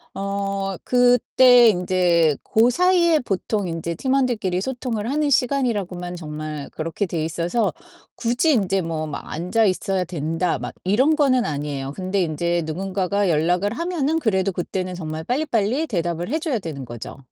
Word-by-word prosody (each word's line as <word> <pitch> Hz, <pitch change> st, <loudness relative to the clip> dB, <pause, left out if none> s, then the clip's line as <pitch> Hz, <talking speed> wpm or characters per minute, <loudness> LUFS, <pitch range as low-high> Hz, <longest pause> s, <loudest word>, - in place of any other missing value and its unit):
어 195 Hz, 0 st, -2 dB
그때 245 Hz, 0 st, +5 dB
인제 175 Hz, -5 st, +2 dB
고 225 Hz, +2 st, +3 dB
사이에 345 Hz, +2 st, +3 dB
보통 205 Hz, -3 st, -2 dB
인제 165 Hz, 0 st, -3 dB
팀원들끼리 240 Hz, -, 0 dB
소통을 240 Hz, -2 st, -3 dB
하는 295 Hz, 0 st, +1 dB
시간이라고만 210 Hz, -10 st, 0 dB
정말 155 Hz, -2 st, -6 dB
그렇게 165 Hz, +5 st, -3 dB
돼 165 Hz, -3 st, -3 dB
있어서 175 Hz, +7 st, -1 dB, 0.4 s
굳이 245 Hz, +7 st, +1 dB
인제 195 Hz, -4 st, +1 dB
뭐 160 Hz, -2 st, -3 dB
막 150 Hz, -, -6 dB
'앉아 180 Hz, +8 st, +1 dB
있어야 190 Hz, 0 st, 0 dB
된다.' 165 Hz, +1 st, -1 dB
막 -, -, -6 dB
이런 260 Hz, +11 st, +3 dB
거는 260 Hz, -5 st, +3 dB
아니에요. 140 Hz, -2 st, -3 dB
근데 190 Hz, +2 st, -1 dB
인제 170 Hz, +1 st, 0 dB
누군가가 190 Hz, +4 st, -1 dB
연락을 175 Hz, +6 st, +1 dB
하면은 325 Hz, 0 st, -1 dB
그래도 195 Hz, -, +1 dB
그때는 185 Hz, +1 st, -3 dB
정말 160 Hz, -2 st, -5 dB
빨리빨리 255 Hz, -, 0 dB
대답을 175 Hz, -2 st, -2 dB
해 310 Hz, +5 st, 0 dB
줘야 305 Hz, -6 st, -1 dB
되는 150 Hz, -7 st, -6 dB
거죠. 120 Hz, +1 st, -8 dB
195 Hz, 335 characters per minute, -22 LUFS, 170-245 Hz, 0.4 s, 그때